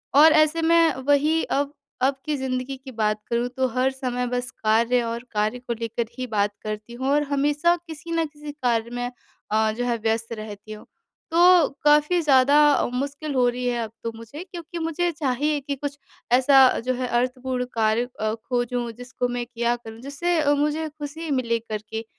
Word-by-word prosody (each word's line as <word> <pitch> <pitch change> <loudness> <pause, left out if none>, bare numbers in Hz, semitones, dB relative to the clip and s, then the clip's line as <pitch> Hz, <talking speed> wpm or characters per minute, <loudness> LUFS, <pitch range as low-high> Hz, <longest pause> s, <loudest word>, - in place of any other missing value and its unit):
और 310 +2 +8
ऐसे 310 +1 +4
मैं 330 -1 +4
वही 300 +3 +3
अब 285 +1 -1 0.3
अब 270 +1 +3
की 305 -1 0
ज़िंदगी 260 0 -3
की 265 0 -11
बात 215 -2 0
करूँ 235 +1 0
तो 260 0 +2
हर 255 +2 +1
समय 250 -2 -3
बस 250 +1 -2
कार्य 230 +3 +3
और 230 +1 -4
कार्य 215 +3 0
को 245 -1 -4
लेकर 230 0 -2
ही 255 0 -3
बात 205 -2 0
करती 215 +2 -6
हूँ 260 +2 -4
और 295 +1 +3
हमेशा 295 +5 +2
किसी 320 +1 -8
न 330 -1 +1
किसी 295 -1 -9
कार्य 235 -5 -1
में 245 0 -3 0.4
अ, 220 0 +3
जो 245 +3 -3
है 240 -1 0
व्यस्त 225 +1 0
रहती 215 -1 -8
हूँ। 215 0 -9 0.5
तो 345 -2 +6 0.2
काफ़ी 300 +4 +4
ज़्यादा 280 -1 +5 0.4
मुश्किल 285 +3 -3
हो 250 -1 +4
रही 250 +1 -4
है 240 -1 0
अब 220 - -7
तो 230 - -2
मुझे 230 +9 -9
क्योंकि 340 -1 -7
मुझे 330 +2 0
चाहिए 295 0 0
कि 280 +1 -3
कुछ 285 +1 -5 0.3
ऐसा 265 +1 +7
अ, - - 0
जो 255 +2 -1
है 255 0 -2
अर्थपूर्ण 250 +1 -1
कार्य 225 +1 +1
अ, 215 0 0
खोजूँ 245 0 -2
जिसको 245 +1 -4
मैं 245 0 -3
किया 240 0 -1
करूँ 225 -2 -11
जिससे 320 +6 -1
अ, 290 0 +3
मुझे 300 +2 0
ख़ुशी 305 +2 -7
मिले 235 -3 +1
करके 220 0 -6
255 Hz, 190 wpm, -24 LUFS, 235-295 Hz, 0.5 s, और